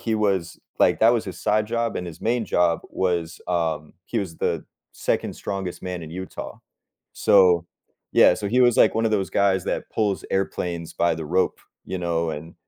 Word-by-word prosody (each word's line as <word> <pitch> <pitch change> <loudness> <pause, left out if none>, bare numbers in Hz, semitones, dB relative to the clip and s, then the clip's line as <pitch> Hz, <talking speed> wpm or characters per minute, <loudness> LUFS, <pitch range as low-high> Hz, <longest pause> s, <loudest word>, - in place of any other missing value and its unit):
he 115 -1 -1
was 95 -6 0 0.2
like - - +4
that 115 +2 +6
was 120 -2 0
his 95 - -6
side 105 0 +1
job, 115 0 -1
and 90 - -4
his 80 - -9
main 115 +1 +1
job 85 -1 +2
was, 85 -3 -1
um, 80 -4 -1
he 120 - -2
was 95 -6 -4
the - - -1 0.3
2nd - - -1
strongest 95 -3 -5
man 90 -2 -4
in 80 - -8
Utah. 95 +2 -7 0.5
So, 90 -4 +4 0.5
yeah 90 - +6
so, 105 - -4
he 125 +5 +2
was, 120 -2 +5
like, - - +5
1 115 - +1
of 110 - +2
those 100 -3 0
guys 95 -2 +2
that - - -3
pulls 105 -3 0
airplanes 90 -3 -2
by 85 -1 +2
the 80 0 -5
rope, 90 +4 +1 0.3
you 95 - -4
know, 85 -1 -1
and 80 +2 -7
95 Hz, 195 wpm, -24 LUFS, 85-105 Hz, 0.5 s, that